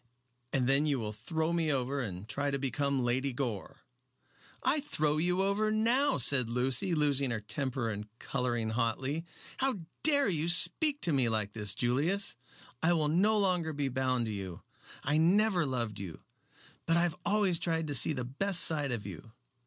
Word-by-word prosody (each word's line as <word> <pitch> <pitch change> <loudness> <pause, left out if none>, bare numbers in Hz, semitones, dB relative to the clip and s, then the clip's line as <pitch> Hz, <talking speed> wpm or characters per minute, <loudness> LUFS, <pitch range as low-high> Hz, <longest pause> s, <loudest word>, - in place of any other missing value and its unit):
"And 125 -2 0
then 140 +3 +2
you 145 -2 +1
will 105 -3 -4
throw 160 +9 -3
me 165 -2 0
over 135 +1 -1
and 100 -4 -6
try 145 +3 -2
to 140 - -1
become 135 0 -1
Lady 130 +3 0
Gore." 130 0 -5 0.8
"I 305 - +3
throw 155 - -1
you 180 +4 +1
over 200 +2 0
now," 235 +6 +2
said 125 -2 +4
Lucy, 130 +9 +1
losing 140 -3 +2
her 115 -2 -2
temper 120 +4 -3
and 105 0 -6
coloring 120 -4 -2
hotly. 130 +7 -2 0.3
"How 260 -8 -1 0.2
dare 285 -2 +4
you 165 -3 -1
speak 290 - +4
to 165 - 0
me 130 -4 +2
like 105 -2 -2
this, 105 -2 -2
Julius! 145 - 0 0.5
I 175 +2 +3
will 155 -3 0
no 205 +7 +2
longer 180 -5 0
be 140 -1 -2
bound 130 -2 -1
to 110 - -4
you. 95 -4 -7 0.4
I 145 +3 +1
never 180 0 +2
loved 115 -6 -3
you, 90 -5 -8 0.6
but 165 - +3
I 170 - +3
have 175 -3 -1
always 200 -5 +2
tried 165 -1 -1
to 145 - -4
see 140 +4 +4
the 125 -4 -4
best 180 +8 +1
side 145 -4 +2
of 115 -4 -4
you. 100 +3 -10
140 Hz, 180 wpm, -30 LUFS, 120-170 Hz, 0.8 s, said